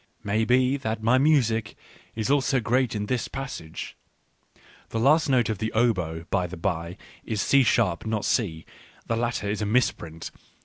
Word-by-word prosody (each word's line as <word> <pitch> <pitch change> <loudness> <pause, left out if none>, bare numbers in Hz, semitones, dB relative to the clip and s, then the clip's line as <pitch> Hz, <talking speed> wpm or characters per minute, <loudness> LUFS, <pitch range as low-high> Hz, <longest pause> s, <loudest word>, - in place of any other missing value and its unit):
Maybe 125 +6 +2
that 110 -4 -4
my 120 +3 +4
music 115 -8 +2 0.4
is 110 +3 -1
also 135 -2 +2
great 125 +1 +1
in 105 0 -2
this 120 +1 -1
passage. 135 -12 -7 0.9
(The 115 - -2
last 150 +6 +4
note 125 -4 +3
of 110 -3 -3
the 110 - -2
oboe, 90 -8 0
by 90 -2 +1
the 90 +1 -8
bye, 85 0 -3 0.3
is 110 -2 -3
C 140 +5 +4
sharp, 110 -6 +1
not 110 -2 -1
C. 85 -9 -1 0.4
The 115 - -1
latter 115 -2 -2
is 105 +1 -2
a 105 - -1
misprint.) 85 -8 -1
110 Hz, 165 wpm, -25 LUFS, 100-125 Hz, 0.9 s, my